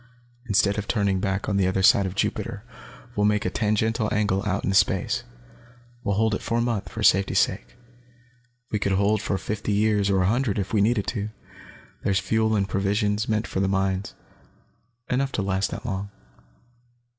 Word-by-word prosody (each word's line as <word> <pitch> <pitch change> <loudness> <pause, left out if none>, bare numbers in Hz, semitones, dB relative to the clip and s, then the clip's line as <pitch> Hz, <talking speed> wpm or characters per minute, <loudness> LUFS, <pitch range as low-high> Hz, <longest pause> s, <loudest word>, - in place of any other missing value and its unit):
Instead 100 0 +2
of 105 - -5
turning 100 -4 +1
back 95 +1 -2
on 100 - 0
the 95 -2 +2
other 95 +1 0
side 100 0 +5
of 95 - -7
Jupiter, 100 +1 -2 0.5
we'll 105 - +1
make 105 -1 +1
a 90 - 0
tangential 110 +1 0
angle 100 -2 +1
out 100 - -1
into 95 - 0
space. 95 +6 +2 0.8
We'll 100 -1 0
hold 110 +1 +2
it - - -2
for 115 - -1
a - - +2
month, 115 -4 -2
for 110 - -5
safety's 95 0 +4
sake. - - 0 1.0
We 105 - 0
could 100 0 0
hold 100 +2 +2
for 100 - -1
fifty 105 +3 -3
years, 105 -1 +2
or 95 -1 +2
a - - +2
hundred, 120 -1 +1
if 100 +1 -3
we 105 - +3
needed 105 -1 +2
to. 105 -3 -3 0.7
There's 100 -1 +1
fuel 110 +3 +1
and 100 -2 +1
provisions, 105 +2 0
meant 110 0 0
for 95 - -3
the 95 - +2
mines, 95 0 -1 0.9
enough 135 +2 0
to 105 - -1
last 95 0 0
that 115 - -7
long. 100 -3 -3
100 Hz, 185 wpm, -25 LUFS, 95-110 Hz, 1.0 s, side